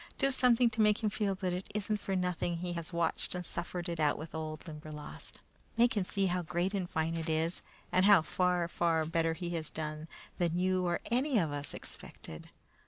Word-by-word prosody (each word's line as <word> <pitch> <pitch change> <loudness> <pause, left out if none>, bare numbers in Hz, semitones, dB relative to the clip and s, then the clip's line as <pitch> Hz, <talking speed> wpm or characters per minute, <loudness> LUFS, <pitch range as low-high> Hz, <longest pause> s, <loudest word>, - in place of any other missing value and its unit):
Do 275 0 +2
something 250 -2 +5
to 220 0 0
make 210 +1 +4
him 210 - +2
feel 200 -3 0
that 185 -1 -1
it 180 +1 -4
isn't 210 +1 +1
for 195 -1 -2
nothing 180 -1 0
he 175 +1 -3
has 170 0 -5
watched 170 +1 -1
and 180 0 -3
suffered 175 +1 -3
it 170 -1 -3
out 150 -2 +3
with 155 +1 -7
that - - -5
old 155 +2 -6
Limberlost. 150 -1 -8 0.3
Make 235 0 +4
him 200 -3 +1
see 195 +1 0
how 180 -1 +1
great 175 +3 -1
and 185 -3 -1
fine 160 +1 0
it 165 0 -2
is, 160 +2 0 0.3
and 185 +1 +4
how 200 -5 +8
far, 180 +1 +1
far 165 -2 +1
better 165 0 +1
he 175 0 -4
has 160 -3 -2
done 155 0 -4 0.3
than 170 -1 +1
you 185 0 +2
or 175 - 0
any 255 +2 +2
of 165 -7 +2
us 145 0 -4
expected! 80 - -8
175 Hz, 215 wpm, -32 LUFS, 160-195 Hz, 0.3 s, how